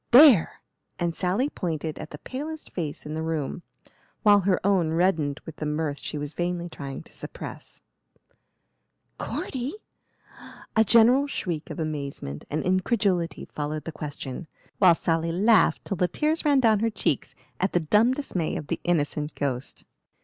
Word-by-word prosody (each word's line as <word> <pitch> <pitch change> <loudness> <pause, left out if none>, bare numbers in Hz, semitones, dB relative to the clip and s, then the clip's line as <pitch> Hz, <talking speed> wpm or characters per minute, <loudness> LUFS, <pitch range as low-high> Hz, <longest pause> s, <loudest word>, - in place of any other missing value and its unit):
"There!" 250 - +7 0.4
and 170 -1 -1
Sally 190 - +1
pointed 160 - -3
at - - -7
the 150 - -8
palest 300 - -6
face 155 -5 -4
in 150 - -5
the 160 - -2
room, 160 0 -2 0.6
while 205 -2 +7
her 190 -1 +2
own 180 -5 +3
reddened 160 -4 +1
with 160 - -9
the 150 - -3
mirth 150 -1 -2
she 150 - -5
was 145 +1 -5
vainly 175 0 -2
trying 140 -4 -7
to - - -16
suppress. - - -9 1.4
"Cordy?" 260 +6 -3 1.0
A 220 - +6
general 240 +6 +5
shriek 170 - -3
of - - -6
amazement 140 - -4
and 155 - -1
incredulity 185 -2 +1
followed 150 +1 -3
the 165 - -5
question, 145 0 -6 0.3
while 180 -4 +7
Sally 165 0 0
laughed 210 +5 +4
till 195 - -3
the 180 - +2
tears 310 - 0
ran 290 -3 +4
down 220 -4 +4
her 225 +2 +2
cheeks 215 - -1 0.2
at 190 - 0
the 175 - +4
dumb 210 +10 +3
dismay 185 - -2
of 150 - -4
the - - -1
innocent 150 -3 0
ghost. 135 -2 -3
175 Hz, 155 wpm, -26 LUFS, 155-215 Hz, 1.4 s, There